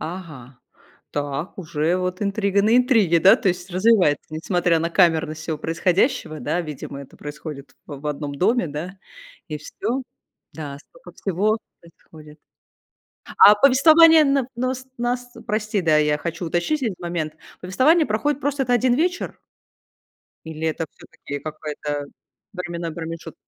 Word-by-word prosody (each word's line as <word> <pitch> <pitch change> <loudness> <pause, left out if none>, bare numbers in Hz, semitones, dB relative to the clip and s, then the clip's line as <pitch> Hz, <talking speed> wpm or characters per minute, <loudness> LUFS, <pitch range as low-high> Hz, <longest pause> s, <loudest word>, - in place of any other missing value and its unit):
Ага, 155 -8 -8 0.5
так, 145 +3 -4
уже 165 -1 -1
вот 180 0 -3
интрига 200 -1 +1
на 220 +3 +4
интриге. 225 - +4
Да, 190 - +7
то - - 0
есть 180 +1 -3
развивается, 185 -5 +3
несмотря 170 +1 +1
на 165 +1 -2
камерность 160 -3 +2
всего 160 -1 -3
происходящего, 170 - 0
да. 175 - -1
Видимо, 150 -3 -7
это 140 - -13
происходит 145 -1 -9
в 145 -2 -8
в 150 - -7
одном 145 -1 -4
доме, 225 - +1
да. 170 +7 -6 0.5
И 155 -1 -4
всё. 230 - -4 0.5
Да. 145 -2 -7
Столько - - -16
всего 205 +4 0 0.2
происходит. 155 -2 -16 1.0
А 205 - +9
повествование 315 +6 +7
на 275 -3 +1
нус 255 +1 -3
нас, 245 0 -2
прости, 215 -1 -1
да, 160 -3 +3
я 150 -1 +2
хочу 170 +2 -4
уточнить 175 - -1
один 225 -6 -1
момент. 170 -3 -3 0.3
Повествование 285 - +3
проходит, 280 +7 -1
просто 285 0 -1
это 245 - -1
1 245 +1 +3
вечер? 350 +6 -1 1.1
Или 160 0 -3
это 160 +1 -3
всё-таки 145 0 -9
какой-то 150 -1 -5 0.5
временной 170 -3 -5
промежут 165 -1 -7
175 Hz, 140 wpm, -22 LUFS, 155-230 Hz, 1.1 s, А